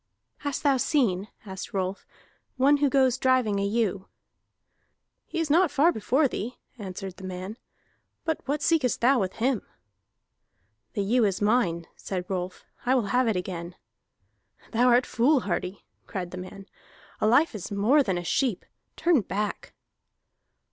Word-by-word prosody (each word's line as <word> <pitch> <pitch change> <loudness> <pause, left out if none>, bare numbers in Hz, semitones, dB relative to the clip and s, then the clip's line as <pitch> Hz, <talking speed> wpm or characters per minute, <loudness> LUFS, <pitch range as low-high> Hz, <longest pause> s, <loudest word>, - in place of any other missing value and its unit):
"Hast 285 -2 -4
thou 280 -2 +4
seen," 215 - +1 0.2
asked 190 0 -7
Rolf, 190 0 -2 0.5
"one 280 +3 +5
who 285 -1 +2
goes 260 -1 +3
driving 255 -6 +2
a - - 0
ewe?" 200 -2 0 1.2
"He 335 - -4
is 320 -3 0
not 350 +3 +5
far 300 +4 +4
before 270 +4 +2
thee," 245 0 -5 0.2
answered 190 -1 -6
the - - -11
man. 185 +2 -5 0.7
"But 320 -2 -1
what 285 +1 -1
seekest 300 -7 +2
thou 255 +2 +4
with 190 -3 -1
him?" 245 -1 0 1.3
"The 205 - -1
ewe 235 +4 +2
is 195 -3 +1
mine," 205 -6 +1
said 185 -2 -4
Rolf. 185 -1 -4 0.2
"I 255 +2 +3
will 225 -6 0
have 250 0 +3
it 220 - +1
again." 180 -1 -4 1.0
"Thou 245 +2 +3
art 245 +1 +5
foolhardy," 215 - 0 0.2
cried 180 -3 -4
the 185 - -7
man. 195 +2 -9 0.5
"A - - +2
life 265 +8 +4
is 205 -3 -6
more 215 +9 +4
than 190 -9 0
a 175 - -3
sheep. 235 +3 0 0.3
Turn 335 -7 +3
back!" 205 +1 -4
220 Hz, 150 wpm, -27 LUFS, 190-265 Hz, 1.3 s, one